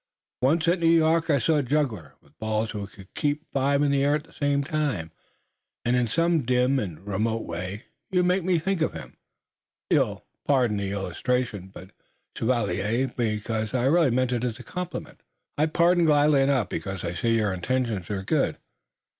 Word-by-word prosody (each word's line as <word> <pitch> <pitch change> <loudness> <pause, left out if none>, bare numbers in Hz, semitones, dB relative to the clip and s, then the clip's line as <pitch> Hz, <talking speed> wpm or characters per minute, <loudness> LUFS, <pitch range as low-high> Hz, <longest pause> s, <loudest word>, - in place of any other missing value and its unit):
Once, 160 +6 +2
at 175 +1 +3
New 165 -1 +3
York, 165 0 +3
I 145 - +4
saw 150 +5 +2
a - - +3
juggler 125 - -1
with - - -26
balls 110 0 -1
who 105 -2 -5
could 95 0 -16
keep 150 +1 -1
five 140 +1 +2
in 145 - +2
the 140 -1 +2
air 145 +1 +3
at 150 - -3
the - - -21
same 145 -1 0
time, 145 - -2 0.7
and 120 +1 +2
in 125 -1 +2
some 165 +6 +2
dim 125 +2 +2
and 95 -4 -6
remote 110 +3 -1
way 90 +5 -5 0.3
you 180 -1 +2
make 180 +1 +2
me 180 0 +2
think 185 +2 -1
of 160 - +1
him. - - -10 0.7
You'll - - +1 0.2
pardon 125 -7 +2
the 100 -1 -2
illustration, 100 +1 -2 0.6
chevalier, 115 +1 0
because 110 0 -2
I 125 - +1
really 160 +1 +4
mean 125 +1 +1
it 120 -1 -1
as 120 -3 -2
a - - -10
compliment." 180 -1 -6 0.3
"I 150 +2 +2
pardon 170 +2 +3
gladly 145 -2 +4
enough, 135 -5 +2
because 95 -1 -4
I 85 0 -2
see 115 +6 +1
your 105 -4 +1
intentions 110 -1 -2
are 100 -2 -3
good. - - 0
125 Hz, 180 wpm, -26 LUFS, 105-150 Hz, 0.7 s, I